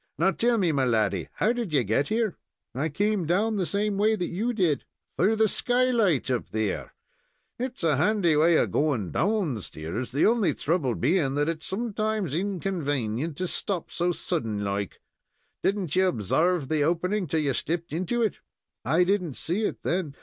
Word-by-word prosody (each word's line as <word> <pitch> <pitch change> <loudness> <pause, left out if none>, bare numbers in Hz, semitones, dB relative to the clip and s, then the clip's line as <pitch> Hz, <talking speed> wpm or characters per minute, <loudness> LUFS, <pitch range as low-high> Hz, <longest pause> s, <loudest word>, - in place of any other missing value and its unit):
Now - - +3
tell 235 0 +2
me, 180 -6 +2
my 140 -3 +1
laddy, 105 -7 +1
how 225 - +1
did 235 -9 -4
you 135 -4 +3
get 115 +7 +1
here?" 220 -3 0 0.4
"I 145 +6 -1
come 200 +2 0
down 210 +6 +1
the 185 -3 0
same 200 0 -1
way 215 +2 +3
that 180 -4 -3
you 215 +8 -1
did." 180 - +1 0.3
"Through 205 +5 +3
the 220 0 +3
skylight 235 - +2
up 125 - -2
there? 110 -2 -3 0.6
It's 250 -4 -4
a 155 -4 +3
handy 180 -1 +2
way 160 +3 +4
of - - +1
going 130 - 0
down 190 - 0
stairs, 90 +11 -5
the 140 - +2
only 225 -3 +3
trouble 150 -6 0
being 140 -1 +1
that 145 +1 +1
it's 165 -1 -3
sometimes 215 - -2
inconvanient 155 - -2
to 185 - -1
stop 185 0 -2
so 175 +1 0
suddint 115 - -2
like. 100 -1 -3 0.6
Did 200 - +1
n't 180 -7 -3
you 190 0 +4
obsarve 160 - +1
the 155 0 +1
opening 180 +5 0
till 155 +2 0
you 140 -3 0
stepped 170 +4 -3
into 185 +8 0
it?" 215 - -1 0.4
"I 170 +3 +3
didn't 180 -6 0
see 195 +6 -1
it - - -4
then. 170 -5 -1
175 Hz, 180 wpm, -26 LUFS, 140-205 Hz, 0.6 s, way